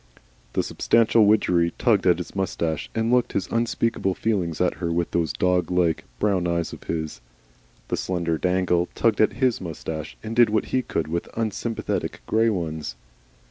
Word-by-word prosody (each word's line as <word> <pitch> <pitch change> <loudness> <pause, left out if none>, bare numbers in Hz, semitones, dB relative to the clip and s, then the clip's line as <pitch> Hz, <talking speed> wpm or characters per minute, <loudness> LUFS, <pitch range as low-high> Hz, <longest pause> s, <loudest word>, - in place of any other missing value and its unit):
The - - +1
substantial 115 -2 +3
Widgery 90 -5 +3
tugged - - +2
at - - +5
his - - -7
moustache, 85 -4 -2
and 115 +1 +1
looked 125 -1 +2
his 95 - 0
unspeakable 115 -4 0
feelings 95 -8 -1
at 90 - +1
her 85 -1 -1
with 85 0 -1
those 85 -2 0
dog 90 -2 +1
like, 90 -3 +1
brown 95 -4 +1
eyes 85 -1 -1
of - - -11
his; 80 -2 -4 0.7
the - - -1
slender 85 -3 -1
Dangle 90 -1 +1
tugged 115 -2 +2
at 110 - +3
HIS 130 -4 +1
moustache, 80 -2 -6
and 110 +1 -5
did 120 -1 +6
what 110 +1 +1
he 130 - +3
could 85 -9 -2
with 85 +2 -3
unsympathetic 115 0 -2
grey 115 +1 +3
ones. 80 - -3
90 Hz, 170 wpm, -24 LUFS, 85-110 Hz, 0.7 s, did